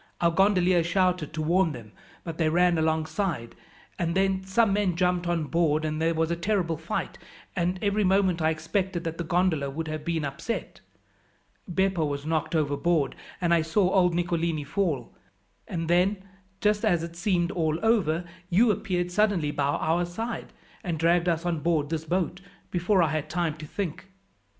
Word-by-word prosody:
Our 170 -1 +3
gondolier 185 -2 +3
shouted 180 -2 +1
to 155 - -2
warn 170 0 +2
them, 115 -4 -10 0.3
but 165 -1 -7
they 160 -1 +3
ran 175 0 +3
alongside, 160 - -1 0.5
and 170 -1 0
then 190 0 +2
some 195 +2 +2
men 200 -4 +1
jumped 180 0 +1
on 170 -2 0
board, 155 -1 +1
and 155 0 -2
there 165 0 +2
was 160 +1 0
a - - +1
terrible 170 -2 0
fight, - - -4 0.4
and 180 +1 0
every 205 +1 +2
moment 190 -3 +2
I 155 - +3
expected 170 +3 -2
that 165 0 -4
the - - -1
gondola 165 -4 +1
would 160 +4 -4
have 155 -1 -4
been 165 -2 -1
upset. 140 +12 -5 0.9
Beppo 190 -1 +1
was 145 -1 -3
knocked 160 +1 -1
overboard, 150 +1 +1 0.2
and 175 -1 +2
I 170 - +4
saw 180 +4 +1
old 180 -3 +3
Nicolini 170 -3 0
fall; 150 - -2 0.5
and 165 -2 -3
then, 185 +3 +2 0.4
just 210 0 +2
as 175 -7 +2
it 170 0 -7
seemed 175 -1 0
all 160 -3 0
over, 180 -7 +2 0.2
you 215 +5 +4
appeared 180 -2 -2
suddenly 190 -6 +2
by 145 -1 -1
our 160 +4 +1
side, 225 +7 -5 0.3
and 170 -3 -2
dragged 170 +2 +3
us 165 0 -1
on 170 -3 0
board 155 -1 0
this 160 -1 -2
boat 180 +2 -1 0.3
before 180 +1 +2
I 160 - +2
had 155 0 -2
time 170 -2 -1
to 155 -1 -8
think." 195 +1 -4
170 Hz, 175 wpm, -27 LUFS, 160-185 Hz, 0.9 s, I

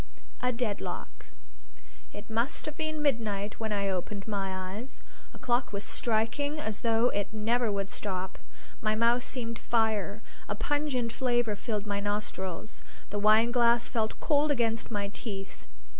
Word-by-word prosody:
A 250 - +2
DEADLOCK 230 -4 -3 0.9
It 205 - -9
must 230 +5 0
have 305 - -3
been 310 -1 -2
midnight 215 -7 0
when 220 -1 -2
I 200 -1 +1
opened 195 +2 -2
my 190 -3 -2
eyes; 245 +6 -8 0.3
a - - -12
clock 245 0 +1
was 200 0 -2
striking 240 +9 +1
as 220 -7 -3
though 230 +1 +4
it 205 -1 -1
never 225 +1 +1
would 200 -1 -1
stop. 190 -2 -3 0.4
My 215 0 +2
mouth 235 +2 +4
seemed 230 -3 -3
fire; 220 -2 +1 0.3
a 205 - 0
pungent 275 -2 0
flavor 240 -4 +1
filled 210 -1 -2
my 200 -1 -1
nostrils; 205 -1 -3 0.3
the 205 - -1
wineglass 235 +3 +5
felt 220 -2 -1
cold 295 0 +3
against 230 -5 +1
my 205 -3 -1
teeth. 200 -2 -6
220 Hz, 145 wpm, -30 LUFS, 205-240 Hz, 0.9 s, wineglass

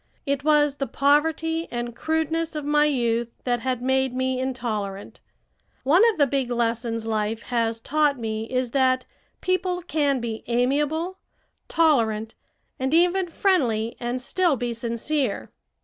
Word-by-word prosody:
It 280 -1 -1
was 295 -2 +3
the 275 - -2
poverty 320 +3 +1
and 240 -1 -4
crudeness 320 +2 -1
of 300 -2 -4
my 295 0 +3
youth 235 -5 0
that 245 -1 0
had 255 0 -2
made 265 -1 +1
me 260 0 0
intolerant. 220 -7 -4 0.6
One 310 +8 +5
of 440 - -2
the 290 - +5
big 270 -2 -1
lessons 230 -1 -1
life 220 0 -1
has 230 -2 -1
taught 295 +3 +1
me 220 -1 -3
is 255 0 -2
that 255 -1 +2 0.4
people 365 -1 0
can 290 -5 +1
be 230 -2 -5
amiable, 295 +9 0 0.5
tolerant, 225 -9 +2 0.5
and 265 +4 +1
even 355 +2 +3
friendly, 250 - +1
and 240 +1 -2
still 335 +5 +1
be 240 -1 -3
sincere. 235 +2 -2
260 Hz, 140 wpm, -24 LUFS, 235-305 Hz, 0.6 s, One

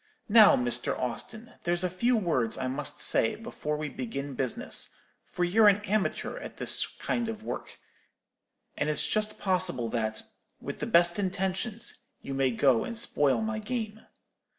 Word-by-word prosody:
Now, 215 -1 +8
Mr. 120 0 -1
Austin, 215 - -5
there's 175 +1 0
a - - +2
few 235 +8 +1
words 130 - 0
I 130 - -2
must 145 +3 -2
say 115 - +3
before 180 -9 -4
we 155 0 -3
begin 135 +1 -5
business; 130 -1 -1 0.3
for 180 - -2
you're 210 +5 +5
an 205 +1 +4
amateur 215 - -1
at - - -9
this - - +3
kind 235 -1 -3
of 220 -1 -6
work, - - -6 1.0
and - - -1
it's 150 - +1
just 215 0 0
possible 180 - +1
that, 110 -1 -1 0.4
with - - -6
the - - -3
best 170 +2 +4
intentions, 190 +4 -2 0.3
you 135 - -5
may 135 -1 +2
go 125 0 +3
and 235 - -5
spoil 145 - +1
my 220 0 -2
game. 220 -1 -4
180 Hz, 160 wpm, -28 LUFS, 135-215 Hz, 1.0 s, Now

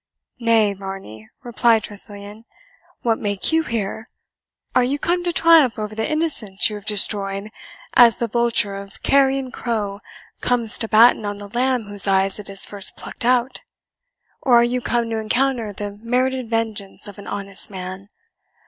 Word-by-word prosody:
"Nay, 225 -3 +3
Varney," 190 - -9
replied 235 -2 +2
Tressilian, 205 +1 -8 0.6
"what 230 -2 +1
make 205 +3 -1
you 320 0 +3
here? 225 -5 -4 0.6
Are 250 - +4
you 265 +4 0
come 350 +4 -1
to 350 - 0
triumph 325 -8 +5
over 215 0 -4
the 220 +1 -2
innocence 290 -12 +1
you - - -5
have 205 0 -10
destroyed, 200 0 +1 0.4
as 235 -2 +6
the 235 - -1
vulture 230 -3 +1
or 200 0 -7 0.2
carrion 270 -1 +2
crow 210 -5 -3 0.4
comes 235 -3 +1
to 225 - -2
batten 225 +1 +5
on 205 0 -4
the 205 0 -9
lamb 250 +2 0
whose 205 -1 0
eyes 195 +1 +1
it 210 - -5
has 195 -1 0
first 200 -2 -1
plucked - - -5
out? 250 +1 +1 0.8
Or 250 -3 +4
are 235 - +6
you 245 +1 0
come 235 -1 0
to 225 - -1
encounter 240 0 0
the 205 +1 -6
merited 250 +3 -1
vengeance 220 -4 -3
of 205 0 -11
an 200 - -11
honest 200 -1 -5
man? 190 0 -8
220 Hz, 165 wpm, -21 LUFS, 200-245 Hz, 0.8 s, as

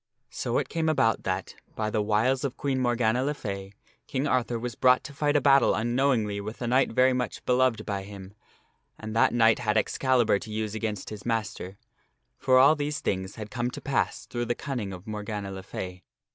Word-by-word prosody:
So 120 -1 -2
it - - 0
came 160 -1 -1
about 115 -8 +2
that, 95 0 -2 0.2
by 110 -1 -2
the 110 - +1
wiles 110 +5 +1
of 135 -3 -3
Queen 135 -2 -1
Morgana 120 -1 +1
le 145 +2 -1
Fay, 100 -6 -6 0.4
King 135 +1 -1
Arthur 125 -4 0
was 120 +1 -4
brought 125 0 +4
to 140 - -9
fight 145 +1 0
a 145 - +4
battle 140 0 +5
unknowingly 120 -3 +1
with 110 +3 -7
a - - -1
knight 130 +3 +2
very 130 +2 +4
much 125 0 -3
beloved 125 -2 +2
by 100 -2 -2
him, 95 -1 -10 0.6
and 110 0 -7
that 115 - +5
that - - -5
knight 115 0 +4
had 110 -2 0
Excalibur 120 -1 +2
to 110 - -10
use 110 0 -3
against 110 -2 -4
his 105 -2 -8
master. 105 -4 -3 0.6
For 130 -1 +4
all 140 +4 +7
these 150 0 -2
things 95 0 -2
had 110 -1 -8
come 120 -1 -1
to - - -7
pass 140 - -1
through 120 0 -3
the 120 - -1
cunning 120 -8 -4
of 90 0 -9
Morgana 105 -2 -5
le 95 0 -6
Fay. 90 -1 -7
115 Hz, 205 wpm, -27 LUFS, 105-130 Hz, 0.6 s, all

